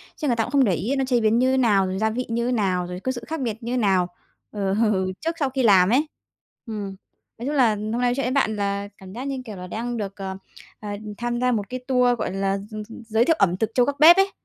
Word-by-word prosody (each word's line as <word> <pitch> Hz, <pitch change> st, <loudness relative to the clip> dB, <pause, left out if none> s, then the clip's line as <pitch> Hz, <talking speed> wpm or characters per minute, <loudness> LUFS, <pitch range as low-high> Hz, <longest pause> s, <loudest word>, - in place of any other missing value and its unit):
Chứ 300 Hz, -, -3 dB
người 245 Hz, -, +2 dB
ta 225 Hz, -, +1 dB
cũng 245 Hz, -, -6 dB
không 280 Hz, -1 st, +4 dB
để 200 Hz, -7 st, +2 dB
ý 215 Hz, -, -1 dB
nó 270 Hz, -1 st, 0 dB
chế 250 Hz, -2 st, +2 dB
biến 220 Hz, +1 st, +3 dB
như 260 Hz, +1 st, +3 dB
nào? 210 Hz, -7 st, +3 dB
Rồi 185 Hz, 0 st, -3 dB
gia 220 Hz, +1 st, +2 dB
vị 245 Hz, +3 st, -3 dB
như 235 Hz, +2 st, 0 dB
nào? 190 Hz, -6 st, 0 dB
Rồi 180 Hz, 0 st, -6 dB
có 260 Hz, -, -2 dB
sự 245 Hz, -2 st, -6 dB
khác 320 Hz, -1 st, -4 dB
biệt 230 Hz, -2 st, -3 dB
như 240 Hz, +2 st, -2 dB
nào, 190 Hz, -6 st, +2 dB, 0.4 s
ờ, 195 Hz, -2 st, -1 dB, 0.5 s
trước 330 Hz, +1 st, -2 dB
sau 280 Hz, -3 st, +1 dB
khi 260 Hz, 0 st, -1 dB
làm 190 Hz, -5 st, +6 dB
ấy. 275 Hz, +7 st, +2 dB, 0.6 s
Ừm. 205 Hz, -4 st, -5 dB, 0.4 s
Nói 240 Hz, -, -5 dB
chung 295 Hz, -, -1 dB
là 255 Hz, -5 st, +5 dB
hôm 210 Hz, +1 st, -4 dB
nay 235 Hz, -, -1 dB
nói 245 Hz, 0 st, +2 dB
chuyện 275 Hz, -, -1 dB
với 250 Hz, -, 0 dB
bạn 260 Hz, -5 st, +1 dB
là 200 Hz, 0 st, -2 dB
cảm 190 Hz, -1 st, -12 dB
giác 245 Hz, +4 st, -5 dB
như, 270 Hz, -2 st, -3 dB
kiểu 215 Hz, -3 st, -7 dB
là, 180 Hz, -1 st, -8 dB
đang 235 Hz, +5 st, -4 dB
được, 200 Hz, -2 st, -4 dB
ờ, 190 Hz, -1 st, -5 dB, 0.4 s
ờ, 210 Hz, -, -7 dB, 0.3 s
tham 240 Hz, 0 st, -2 dB
gia 250 Hz, 0 st, +3 dB
một 205 Hz, -4 st, -2 dB
cái 255 Hz, -, -4 dB
tour, 250 Hz, -2 st, +3 dB
gọi -, -, -2 dB
là, 195 Hz, 0 st, 0 dB
gi 210 Hz, +2 st, -9 dB
gi 225 Hz, -, -11 dB
giới 225 Hz, +1 st, +2 dB
thiệu 325 Hz, -, +3 dB
ẩm 180 Hz, -2 st, +3 dB
thực 220 Hz, +1 st, 0 dB
trâu 245 Hz, -, +4 dB
gác 285 Hz, +1 st, -3 dB
bếp 325 Hz, +3 st, +9 dB
ấy. 390 Hz, 0 st, +3 dB
230 Hz, 280 wpm, -23 LUFS, 200-255 Hz, 0.6 s, bếp